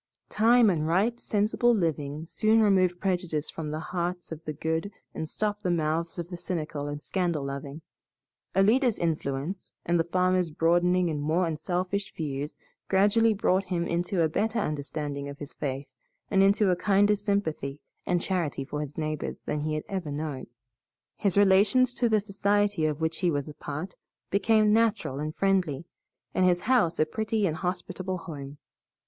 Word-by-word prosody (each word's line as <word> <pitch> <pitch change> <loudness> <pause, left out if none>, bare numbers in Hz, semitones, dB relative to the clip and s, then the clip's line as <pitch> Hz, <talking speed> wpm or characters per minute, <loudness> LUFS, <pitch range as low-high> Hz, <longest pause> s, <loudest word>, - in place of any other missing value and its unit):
Time 230 0 +5
and 155 -3 -1
right, 205 +8 +1
sensible 220 +3 +2
living 155 -4 -2
soon 215 +6 +2
remove 185 -3 +3
prejudice 175 -5 -1
from 160 -2 -5
the 155 +1 -3
hearts 175 +1 -3
of 160 0 -7
the 155 - -3
good 160 +6 -2 0.2
and 160 - -4
stop 210 +2 -2
the 180 - -1
mouths 165 0 0
of 170 -1 -4
the 175 -1 -7
cynical 155 -4 -3
and 145 0 -4
scandal 170 -2 -1
loving. 140 +2 -6 0.7
Alida's 225 +5 +4
influence, 160 +1 -3
and 170 0 +2
the - - +3
farmer's 180 0 +1
broadening 175 +2 +2
and 150 -2 -2
more 160 +5 +1
unselfish 180 +5 -2
views 145 -2 -4 0.3
gradually 210 +3 +4
bought 190 -1 +2
him 175 -2 -1
into 175 +1 0
a - - +4
better 220 +8 -1
understanding 145 -5 -3
of 140 - -8
his 145 -1 -8
faith, 135 0 -4 0.5
and 195 -2 +4
into 195 0 +4
a - - +3
kinder 205 +3 +3
sympathy 200 -9 -2 0.2
and 175 -1 0
charity 165 -7 -1
for 150 +1 -4
his 150 -1 -7
neighbors 155 -1 -3
than 150 - -2
he 155 +1 -1
had 155 - -3
ever 185 -6 -3
known. 145 -2 -4 0.7
His 200 -2 0
relations 205 +6 +5
to 240 -1 +1
the 215 -1 +4
society 200 -3 +1
of 150 0 -3
which 160 0 -1
he 180 - +2
was 145 -3 -1
a 150 - -7
part 155 +6 -6 0.4
became 210 +2 +4
natural 220 - +1
and 155 +1 -4
friendly, 180 -7 +1 0.5
and 185 - +2
his 175 -1 +3
house 225 -8 +2
a 155 - +3
pretty 215 +4 -1
and 160 -4 0
a - - -9
hospitable 185 +1 -3
home. 145 -5 -8
175 Hz, 170 wpm, -27 LUFS, 155-200 Hz, 0.7 s, Time